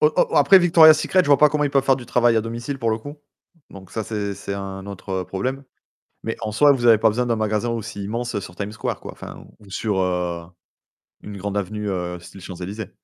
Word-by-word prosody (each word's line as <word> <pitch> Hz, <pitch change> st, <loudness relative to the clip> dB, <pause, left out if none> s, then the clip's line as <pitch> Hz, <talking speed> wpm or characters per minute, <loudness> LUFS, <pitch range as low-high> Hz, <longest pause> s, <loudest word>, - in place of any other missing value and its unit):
Oh 460 Hz, -, +4 dB
oh, -, -, +6 dB
heu, -, -, +1 dB
après 195 Hz, -, +7 dB
Victoria 165 Hz, -3 st, +7 dB
Secrets, 185 Hz, +4 st, +2 dB
je 160 Hz, -, -5 dB
vois 145 Hz, -, +5 dB
pas 150 Hz, -, +6 dB
comment 150 Hz, 0 st, 0 dB
ils 140 Hz, -, -1 dB
peuvent 135 Hz, -1 st, +2 dB
faire 135 Hz, -1 st, +3 dB
du 120 Hz, -3 st, -10 dB
travail 120 Hz, -1 st, +3 dB
à 110 Hz, -, +3 dB
domicile 120 Hz, +5 st, -5 dB
pour 115 Hz, -2 st, 0 dB
le 110 Hz, -, -1 dB
coup. 145 Hz, +6 st, -10 dB, 0.5 s
Donc 95 Hz, -2 st, -13 dB
ça, 110 Hz, -, -3 dB
c'est 100 Hz, -2 st, -3 dB
c'est 100 Hz, -, -6 dB
un 95 Hz, -1 st, -6 dB
autre, 100 Hz, -1 st, -9 dB
heu, -, -, -10 dB
problème. 130 Hz, +10 st, -4 dB, 0.6 s
Mais 115 Hz, -, -3 dB
en 110 Hz, -1 st, -3 dB
soi, 145 Hz, +6 st, +5 dB
vous 125 Hz, -3 st, 0 dB
avez 115 Hz, -2 st, +7 dB
pas 110 Hz, +1 st, +3 dB
besoin 125 Hz, +4 st, -1 dB
d'un 115 Hz, -1 st, 0 dB
magasin 110 Hz, +1 st, -1 dB
aussi 110 Hz, -3 st, -5 dB
immense, 120 Hz, +3 st, -4 dB
heu, 100 Hz, -, -1 dB
sur 85 Hz, -, -10 dB
Time 100 Hz, +2 st, -5 dB
Square 105 Hz, -, -4 dB
quoi, -, -, -8 dB
enfin, -, -, -10 dB, 0.2 s
ou 100 Hz, -, -17 dB
sur, 95 Hz, 0 st, -2 dB
heu, 90 Hz, -2 st, -1 dB, 0.8 s
une 100 Hz, -1 st, -8 dB
grande 100 Hz, +1 st, -4 dB
avenue, 105 Hz, +2 st, -3 dB
heu, 90 Hz, -2 st, -3 dB
style 85 Hz, +3 st, -13 dB
Champs-Élysées. 95 Hz, +3 st, -7 dB
110 Hz, 250 wpm, -22 LUFS, 100-125 Hz, 0.8 s, après